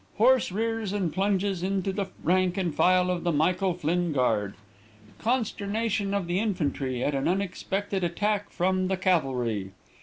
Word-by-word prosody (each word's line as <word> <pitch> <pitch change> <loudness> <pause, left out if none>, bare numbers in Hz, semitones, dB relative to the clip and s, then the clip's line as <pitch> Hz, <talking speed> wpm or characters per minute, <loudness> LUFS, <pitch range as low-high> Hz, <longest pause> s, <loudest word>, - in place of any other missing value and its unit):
Horse 245 -1 +4
rears 225 0 -2
and 185 -6 -1
plunges 195 -1 0
into 195 +1 -1
the 195 0 -2 0.2
rank 185 +1 +2
and 180 -5 -1
file 180 +2 +3
of 175 -2 -2
the 175 - +1
Michael 180 +4 +1
Flinn 175 +1 0
Guard. 105 -7 +1 0.6
Consternation 215 -3 -1
of 200 -3 -1
the 175 +2 0
infantry 145 - -1
at 145 - 0
an 135 0 0
unexpected 195 +1 -2
attack 205 +4 0
from 185 +1 0
the 190 0 0
cavalry. 125 - 0
185 Hz, 150 wpm, -27 LUFS, 170-200 Hz, 0.6 s, Horse